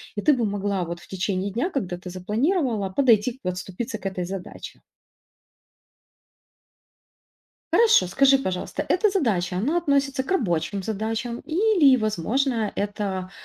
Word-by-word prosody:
и 205 - -2
ты 300 - +4
бы 240 -4 0
могла 200 -2 -1
вот 170 +1 -6
в - - -16
течение 190 +1 -2
дня, 260 - -1
когда 185 - -3
ты 180 +1 -9
запланировала, 220 - 0
подойти, 240 +2 +2
подступиться 185 +6 -4
к 205 - -18
этой 190 -2 -2
задаче. 190 0 -8 2.9
Хорошо, 450 - +5
скажи, 270 +8 +4
пожалуйста, 190 +6 -3
эта 410 +4 +3
задача, 210 - 0
она 280 - 0
относится 280 -5 +1
к - - -12
рабочим 200 - 0
задачам 225 +3 -3
или, 340 -6 +4
возможно, 220 - 0
это, 200 -2 -3
215 Hz, 130 wpm, -24 LUFS, 190-275 Hz, 2.9 s, Хорошо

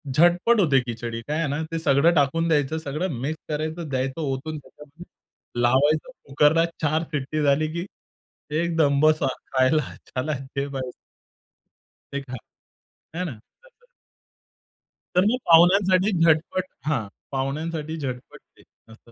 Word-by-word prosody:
झटपट 175 +8 +4
होते 140 -6 +4
खिचडी. 115 0 -4
काय 150 +1 -1
आहे 165 - 0
ना, 145 +3 -2
ते 165 - -2
सगळं 160 +3 +4
टाकून 155 +4 +2
द्यायचं, 155 0 +1
सगळं 150 -2 -3
मिक्स 155 +3 -2
करायचं 155 +1 -3
द्यायचं, 130 +3 -2
ओतून 145 +2 -3
त्याच्यातन. 150 +4 -14 0.6
लावायचं 145 - +2
कुकरला 150 +4 +3 0.2
4 155 +2 +1
शिट्टी 150 +2 -2
झाली, 145 +2 +3
की 170 +2 -3 0.8
एकदम 160 -5 +2
बसा 155 -2 +4 0.3
खायला 130 +2 +2
चला 140 +4 -2 0.2
घे 140 0 -1
भाई. 130 -2 -5 1.2
ते 140 - -2
खा, 130 -2 -8 0.8
आहे 180 - -2
ना, 160 - -4 0.3
तसं. - - -25 1.3
तर 180 - +6
मग 240 +4 +2
पाहुण्यांसाठी 185 +4 +5
झटपट 165 +3 +2 0.2
हां, 120 -10 0 0.2
पाहुण्यांसाठी 155 +4 -3
झटपट 130 -3 -6 0.2
ते - - -19 0.3
असतं. 115 +1 -18
155 Hz, 130 wpm, -24 LUFS, 135-165 Hz, 1.3 s, तर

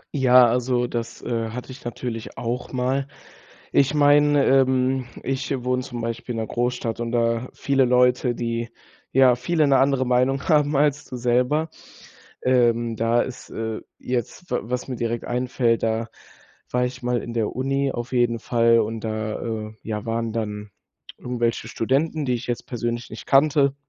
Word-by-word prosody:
Ja, 130 -2 +6
also, 125 +1 +1
das, 120 -1 -5
äh, 115 -2 -2
hatte 125 +3 -7
ich 130 - -11
natürlich 120 -1 -5
auch 120 +1 -3
mal. 130 +2 -1 0.7
Ich 140 +1 +3
meine, 145 -1 +5
ähm, 130 -1 +3 0.2
ich 135 +1 -3
wohne 125 0 +1
zum 120 -3 -6
Beispiel 115 +1 -4
in 115 - -2
'ner - - -4
Großstadt 120 -1 -2
und 115 0 -2
da 115 +1 +1
viele 135 -2 +2
Leute, 125 0 +3
die 115 0 -3 0.4
ja 130 -1 +6
viele 155 +5 +1
'ne 135 -1 +4
andere 135 -1 +3
Meinung 125 +2 +2
haben 150 -3 +3
als 145 0 +2
du 125 - -7
selber, 125 +6 +1 0.7
ähm, 120 -2 +2
da 115 +2 +2
ist, 130 -1 -8
äh, 110 0 -4 0.2
jetzt 125 +8 -4
w 125 - +1
was 125 +4 -4
mir 130 - -3
direkt 115 0 -2
einfällt, 120 -1 0
da 115 +1 0 0.6
war 125 0 +1
ich 125 +1 -5
mal 125 -1 0
in 120 - -6
der 115 0 -2
Uni 135 +1 0
auf 120 +2 -5
jeden 120 -2 +2
Fall 115 0 +3
und 110 +1 -2
da, 110 0 -3
äh, 110 -1 -4
ja 105 -2 -4
waren 115 0 -2
dann 105 -2 -4 0.5
irgendwelche 120 -1 -2
Studenten, 145 +5 0
die 125 - +1
ich 120 0 -4
jetzt 120 -1 -3
persönlich 120 -1 -3
nicht 110 - -8
kannte. 140 0 +4
125 Hz, 170 wpm, -23 LUFS, 115-130 Hz, 0.7 s, Ja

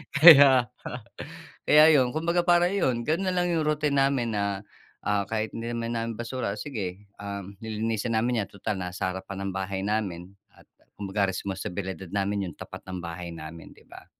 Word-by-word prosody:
Kaya 140 -5 +9 1.0
Kaya 150 0 +7
ayun 130 -3 +3
kumbaga 170 +2 0
para 175 +1 +4
ayon 130 -12 0
ganon 180 +6 0
lang 175 -1 +1
yung 160 -2 0
routine 150 -2 +1
namin 135 -4 +2
na, 100 -1 -1 0.4
ah, 100 -1 0
kahit 110 0 -2
hindi 115 +1 -5
naman 115 0 -3
namin 115 0 -3
basura 120 -2 -3
o - - -9
sige, 100 -7 -5 0.2
um, 100 -1 -7
lilinisin 110 +1 -2
namin 110 -2 +1
yan - - -24
tutal 100 0 -4
nasa 90 0 -3
harapan 95 +1 -5
ng - - -6
bahay 95 0 -3
namin 100 -4 -2 0.2
at - - -20 0.3
kumbaga 100 0 -1
responsibilidad 95 -1 -4
namin 100 0 0
yung - - -13
tapat - - -9
ng 90 -1 -5
bahay 85 0 -6
namin 80 +1 -10
di - - -20
ba. - - -14
110 Hz, 175 wpm, -27 LUFS, 95-135 Hz, 1.0 s, Kaya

